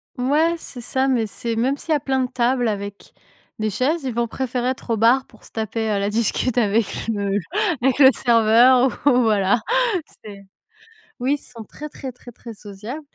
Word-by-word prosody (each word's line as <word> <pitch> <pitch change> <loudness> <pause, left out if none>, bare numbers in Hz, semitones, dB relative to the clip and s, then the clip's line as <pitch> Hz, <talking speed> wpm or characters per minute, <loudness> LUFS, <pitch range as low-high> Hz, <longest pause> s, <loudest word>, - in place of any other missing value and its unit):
Ouais, 300 +7 +1
c'est 250 -6 -8
ça, 260 +3 -1
mais 235 -5 +1
c'est 230 +2 -4
même 260 +5 0
s'il 320 - -6
y - - +5
a - - +1
plein 265 -1 -1
de 250 - -4
table 245 -1 +1
avec 200 -1 -6 0.5
des 215 0 0
chaises, 270 - -1
ils 255 -3 -3
vont 235 0 0
préférer 250 0 -2
être 255 -2 -5
au 225 - +1
bar 245 +5 +3
pour 220 - -21
se - - -14
taper 220 0 -3
la 200 +1 -1
discute 230 +3 0
avec 220 -1 +2 0.2
le 200 -3 -1
le - - +2 0.4
avec 265 +1 +2
le 265 -2 +9
serveur 240 +2 +5 0.2
ou 250 -3 +5
voilà, 210 -1 +2 0.6
c'est 200 -2 -11 0.8
oui, 275 +3 +2
ils - - -6
sont 230 -3 -11
très, 300 +8 -9
très, 265 -3 -7
très, 245 0 -14
très 230 -1 -10
sociables, 210 +8 -8
240 Hz, 195 wpm, -21 LUFS, 220-260 Hz, 0.8 s, le